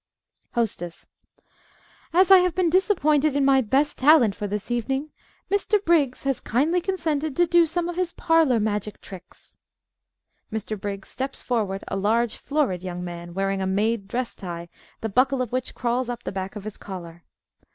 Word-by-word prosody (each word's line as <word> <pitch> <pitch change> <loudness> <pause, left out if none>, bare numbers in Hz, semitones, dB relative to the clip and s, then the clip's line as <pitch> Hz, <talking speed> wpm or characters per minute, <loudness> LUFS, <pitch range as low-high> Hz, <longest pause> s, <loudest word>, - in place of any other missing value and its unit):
"_) - - -33
HOSTESS 195 -7 -2 1.1
As 370 +3 +4
I 380 - +10
have 360 -1 +1
been 365 -3 +2
disappointed 310 -6 +3
in 285 -1 +2
my 270 -1 +5
best 275 +6 +1
talent 260 -6 +6
for 205 +1 -4
this 210 +3 -4
evening, 265 +5 -1 0.4
Mr. 405 +1 +2
Briggs 295 -7 +2
has 270 -1 0
kindly 310 +10 +1
consented 315 -6 -1
to 350 - +4
do 345 0 +4
some 345 +2 -1
of 350 0 -5
his 365 -2 0
parlor 320 -8 +3
magic 210 -1 -2
tricks. 185 -2 -13 0.9
(Mr. 215 0 -3
Briggs 200 -1 -6
_steps 265 +1 -4
forward, 205 -6 -1
a - - -3
large, 225 +3 +1
florid 275 - -1
young 180 -1 -5
man, 175 0 -7
wearing 195 0 0
a 190 - -1
"made" 205 +2 0
dress 245 +3 -2
tie, 170 -2 -7 0.3
the 225 - -1
buckle 255 +5 +2
of 250 -3 -2
which 255 0 -3
crawls 245 0 -1
up 240 -1 -5
the - - -4
back 190 +1 -5
of 210 - -7
his 215 0 -7
collar. 175 -3 -9
245 Hz, 175 wpm, -24 LUFS, 200-305 Hz, 1.1 s, I